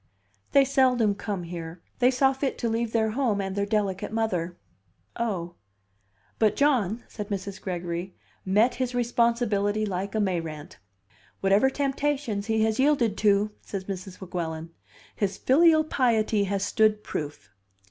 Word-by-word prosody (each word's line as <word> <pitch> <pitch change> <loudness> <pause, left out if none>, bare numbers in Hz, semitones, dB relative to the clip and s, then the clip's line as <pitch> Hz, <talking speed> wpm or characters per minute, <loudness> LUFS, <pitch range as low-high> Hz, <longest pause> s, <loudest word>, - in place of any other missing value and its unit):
"They 275 -1 +6
seldom 255 -5 +3
come 200 -2 -4
here. 170 0 -7 0.2
They 250 0 +5
saw 265 +1 +3
fit 270 0 -2
to 235 - -1
leave 225 0 -1
their 220 -1 +1
home 230 -4 0
and 195 -1 -3
their 200 0 0
delicate 200 -3 -1
mother." 180 -6 -1 0.6
"Oh!" 190 -7 -2 0.9
"But 215 -2 +3
John," 240 -7 +2
said 210 -2 -7
Mrs. 195 -1 -4
Gregory, 175 0 -4 0.3
"met 210 +6 +3
his 250 -1 -1
responsibility 230 -3 +1
like 195 +1 -3
a - - +2
Mayrant." 165 -7 -3 0.6
"Whatever 200 +7 +4
temptations 275 -6 -1
he 220 -1 +2
has 220 +1 0
yielded 265 -7 +3
to," 205 0 +3
said 195 -2 -6
Mrs. 190 -1 -6
Weguelin, 165 -3 -5 0.4
"his 200 -2 -1
filial 315 +3 +5
piety 225 -8 +1
has 200 0 -1
stood 215 0 +2
proof." 145 -9 -6
210 Hz, 140 wpm, -26 LUFS, 190-240 Hz, 0.9 s, They